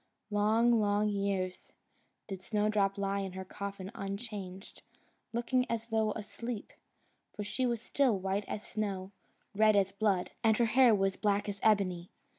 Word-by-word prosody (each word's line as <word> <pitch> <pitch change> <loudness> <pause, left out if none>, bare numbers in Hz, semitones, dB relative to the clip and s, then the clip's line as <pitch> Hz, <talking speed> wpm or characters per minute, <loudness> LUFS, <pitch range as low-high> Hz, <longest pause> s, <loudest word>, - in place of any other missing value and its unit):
Long, 220 +3 +4
long 205 0 +2
years, 195 -2 -2 0.5
did 190 -2 -6
Snowdrop 210 -1 +1
lie 200 0 0
in 190 -2 -4
her 190 0 -6
coffin 195 0 -6
unchanged, 195 -2 -6 0.5
looking 250 +2 0
as 230 -1 -1
though 220 -1 +1
asleep, 225 +1 -6 0.6
for 210 - -4
she 215 +6 -1
was 235 -2 -2
still 260 -7 +2
white 195 +2 -1
as 215 - -4
snow, 195 -3 -3 0.4
red 215 +1 +5
as 195 -1 +3
blood, 200 -3 0
and 220 -1 +4
her 235 - +4
hair 240 0 +6
was 195 -1 +1
black 205 -1 +1
as 205 -1 -4
ebony. 185 -5 +2
205 Hz, 150 wpm, -32 LUFS, 195-220 Hz, 0.6 s, hair